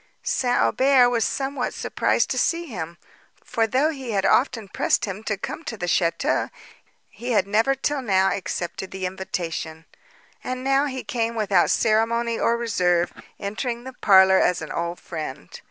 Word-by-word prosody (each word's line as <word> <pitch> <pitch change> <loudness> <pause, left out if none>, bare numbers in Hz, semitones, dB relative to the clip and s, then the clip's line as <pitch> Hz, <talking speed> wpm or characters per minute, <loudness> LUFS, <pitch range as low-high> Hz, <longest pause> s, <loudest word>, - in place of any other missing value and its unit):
St. 245 -1 +1
Aubert 260 -2 +4
was 230 -2 +1
somewhat 270 +1 -2
surprised - - 0
to - - 0
see 340 0 +1
him; 170 - -6 0.5
for, 230 -3 0
though 270 +7 +2
he 265 -6 -6
had 195 -1 +1
often 230 -5 +2
pressed - - +1
him 195 0 -6
to 215 - -1
come 310 - -6
to 225 - -5
the 175 - -3
château, 170 -1 +1 0.6
he 245 +1 -5
had 200 -3 +3
never 225 +7 +2
till 280 +1 -1
now 195 -5 +2
accepted 185 0 -4
the 190 -1 -5
invitation; 170 -3 -4 0.6
and 255 0 -4
now 275 +2 +2
he 260 -2 -5
came 230 -1 -2
without 200 -5 +2
ceremony 230 +1 +1
or 235 - +2
reserve, 180 -7 +1 0.3
entering 235 +4 -3
the 260 0 -8
parlour 190 -4 +6
as 180 - +2
an 155 - -7
old 170 +1 -3
friend. 155 - -7
220 Hz, 165 wpm, -23 LUFS, 185-250 Hz, 0.6 s, parlour